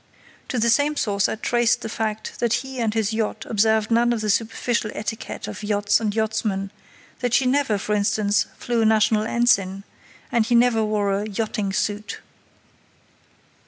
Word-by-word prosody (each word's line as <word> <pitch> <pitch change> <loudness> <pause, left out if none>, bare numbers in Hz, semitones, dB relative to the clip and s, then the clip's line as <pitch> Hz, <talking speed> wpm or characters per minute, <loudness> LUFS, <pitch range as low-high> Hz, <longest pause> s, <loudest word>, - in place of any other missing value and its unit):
To 255 - -3
the 235 +1 +3
same 290 +5 +2
source 200 -7 +1
I - - -2
traced 240 +1 +1
the - - -4
fact 220 -1 -4
that 235 -1 +1
he 265 -1 -7
and 225 -2 +1
his 220 -1 -1
yacht 220 -1 -2
observed 220 0 +2
none 235 +1 +3
of 225 - -2
the 215 -1 +1
superficial 225 +1 -1
etiquette 220 +1 -5
of - - -7
yachts 205 -1 +1
and 215 -2 -1
yachtsmen, 215 -3 -1 0.5
that 245 -2 0
she 270 - +3
never, 255 -4 +2
for 210 +2 -2
instance, 205 0 +1
flew 240 -1 -1
a - - +3
national 215 0 +3
ensign, 195 -5 +1 0.5
and 235 -2 +3
he 240 - +2
never 235 -2 +4
wore 210 -2 0
a 205 +2 -2
"yachting 210 -1 -2
suit". 205 +2 -2
220 Hz, 170 wpm, -23 LUFS, 210-235 Hz, 0.5 s, never